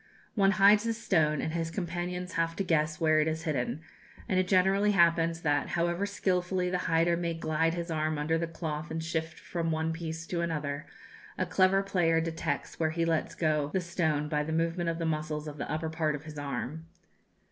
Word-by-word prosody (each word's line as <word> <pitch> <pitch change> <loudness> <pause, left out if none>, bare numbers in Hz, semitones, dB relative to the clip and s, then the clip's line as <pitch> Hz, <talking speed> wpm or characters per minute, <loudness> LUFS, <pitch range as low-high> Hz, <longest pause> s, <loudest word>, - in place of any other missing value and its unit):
One 200 -2 +4
hides 205 +1 +6
the 230 -1 0
stone, 160 -9 +1
and 155 - -3
his 165 -1 -1
companions 180 +1 -4
have 165 0 0
to 195 - -1
guess 155 -3 +1
where 155 -1 +4
it 155 - +2
is 160 0 -2
hidden; 150 -1 -2 0.5
and 185 - +2
it 185 - +1
generally 195 +2 +3
happens 170 -2 +3
that, 145 -2 +1
however 175 +3 0
skilfully 180 -2 0
the 180 - 0
hider 165 +1 +3
may 170 -1 -2
glide 165 +1 0
his 170 0 -4
arm 155 -1 0
under 160 +2 0
the 170 - -1
cloth 160 -1 -4
and 160 0 -3
shift 160 -1 -3
from 170 -2 -3
one 160 0 0
piece 160 0 -5
to 170 0 -2
another, 150 -3 -3 0.5
a - - 0
clever 195 +1 +3
player 175 -4 +2
detects 160 -3 -3
where 160 -1 +2
he 165 +1 0
lets 165 -1 0
go 150 -3 +1
the 190 - +2
stone 160 -4 0
by 150 -1 0
the 150 +2 -3
movement 165 +1 0
of 165 - -2
the 165 - -2
muscles 155 -1 -2
of 150 -1 -7
the - - -4
upper 160 +1 -2
part 155 -2 0
of 145 - -8
his 155 -2 -8
arm. 145 +3 -4
165 Hz, 205 wpm, -30 LUFS, 155-175 Hz, 0.5 s, hides